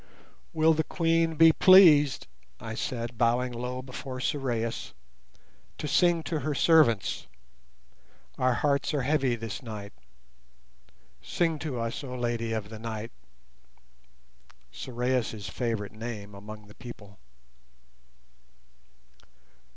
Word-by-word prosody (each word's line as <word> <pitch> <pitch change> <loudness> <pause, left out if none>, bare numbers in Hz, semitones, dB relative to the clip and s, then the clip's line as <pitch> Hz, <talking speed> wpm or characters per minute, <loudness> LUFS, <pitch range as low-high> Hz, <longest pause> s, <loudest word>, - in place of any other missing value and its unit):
"Will 160 0 +4
the 160 0 0
Queen 165 -1 +1
be 165 +1 +7
pleased," 160 -8 +6 0.3
I 110 - -6
said, 120 0 -4
bowing 125 +2 +2
low 125 +2 -5
before 130 0 -7
Sorais, 120 - -2 0.8
"to 150 - -4
sing 170 +1 +3
to 160 -1 -2
her 145 +1 -2
servants? 135 - +3 1.1
Our 130 -1 +2
hearts 140 +2 0
are 140 - 0
heavy 135 -3 +1
this 115 -2 -6
night; 105 -4 -8 1.3
sing 160 - -1
to 145 -5 -4
us, 115 +4 -3
oh 125 -2 -6
Lady 120 -2 -2
of 110 -2 -3
the 110 -1 -9
Night" 110 0 -5 1.6
(Sorais' 120 - -2
favourite 110 0 -3
name 110 -2 -7
among 105 +1 -10
the 105 - -15
people). 105 -5 -12
125 Hz, 110 wpm, -28 LUFS, 110-150 Hz, 1.6 s, be